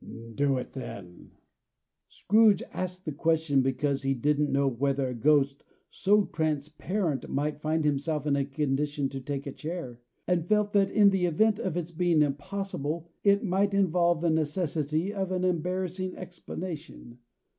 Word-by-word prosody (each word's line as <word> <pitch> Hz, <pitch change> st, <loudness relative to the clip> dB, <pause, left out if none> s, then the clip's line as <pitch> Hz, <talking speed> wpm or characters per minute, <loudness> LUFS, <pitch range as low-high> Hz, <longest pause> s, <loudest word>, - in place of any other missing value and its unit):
"Do 140 Hz, +2 st, +1 dB
it, 125 Hz, -, -6 dB
then." 115 Hz, -9 st, -9 dB, 0.8 s
Scrooge 215 Hz, -2 st, +4 dB
asked 185 Hz, 0 st, -5 dB
the 155 Hz, -, -2 dB
question, 160 Hz, -1 st, +2 dB
because 135 Hz, +1 st, 0 dB
he 135 Hz, 0 st, 0 dB
didn't 150 Hz, +3 st, +1 dB
know 140 Hz, 0 st, +2 dB
whether 135 Hz, +1 st, 0 dB
a -, -, -3 dB
ghost 140 Hz, +3 st, +2 dB, 0.3 s
so 205 Hz, +1 st, +3 dB
transparent 155 Hz, -, -2 dB
might 150 Hz, +2 st, -2 dB
find 155 Hz, 0 st, 0 dB
himself 150 Hz, +1 st, 0 dB
in 145 Hz, -2 st, +2 dB
a 140 Hz, -, +1 dB
condition 145 Hz, 0 st, -1 dB
to 135 Hz, 0 st, -6 dB
take 140 Hz, +1 st, -4 dB
a 140 Hz, -, -4 dB
chair; 150 Hz, -7 st, -6 dB, 0.3 s
and 175 Hz, -1 st, 0 dB
felt 210 Hz, -1 st, +2 dB
that 200 Hz, -1 st, +4 dB
in 205 Hz, -1 st, +5 dB
the 185 Hz, -2 st, +1 dB
event 210 Hz, +6 st, +2 dB
of 190 Hz, -7 st, -2 dB
its 175 Hz, -1 st, -3 dB
being 170 Hz, -2 st, +3 dB
impossible, 165 Hz, +1 st, -3 dB
it 200 Hz, 0 st, +4 dB
might 200 Hz, 0 st, +1 dB
involve 175 Hz, -3 st, +2 dB
the 170 Hz, -1 st, +2 dB
necessity 160 Hz, +2 st, -1 dB
of 190 Hz, -2 st, -2 dB
an 185 Hz, -1 st, -1 dB
embarrassing 185 Hz, +1 st, -2 dB
explanation. 170 Hz, -8 st, -8 dB
155 Hz, 155 wpm, -28 LUFS, 140-185 Hz, 0.8 s, in